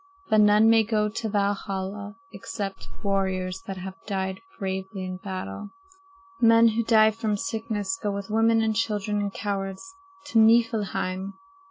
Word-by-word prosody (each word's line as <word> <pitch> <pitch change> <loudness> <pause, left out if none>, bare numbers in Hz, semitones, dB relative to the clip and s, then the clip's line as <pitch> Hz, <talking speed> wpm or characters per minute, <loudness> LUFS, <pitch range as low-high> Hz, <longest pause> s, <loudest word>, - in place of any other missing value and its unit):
But 215 -1 +6
none 210 +1 +6
may 225 0 +6
go 210 -1 0
to 220 +1 -4
Valhalla 200 0 -2 0.2
except 195 -1 -6
warriors 190 -2 -1
that 195 -1 -5
have 190 +1 -8
died 190 -2 -3 0.2
bravely 190 -1 -4
in 185 0 -5
battle. 185 - -6 0.7
Men 230 0 +6
who 225 +1 0
die 220 -1 +5
from 220 -2 -2
sickness 215 -3 -3
go 205 - -1
with 200 0 -4
women 225 +1 +3
and 220 -1 0
children 210 -2 -1
and 205 -1 -2
cowards 195 - -4 0.4
to 225 - +3
Niflheim. 215 -4 +2
205 Hz, 145 wpm, -26 LUFS, 190-220 Hz, 0.7 s, But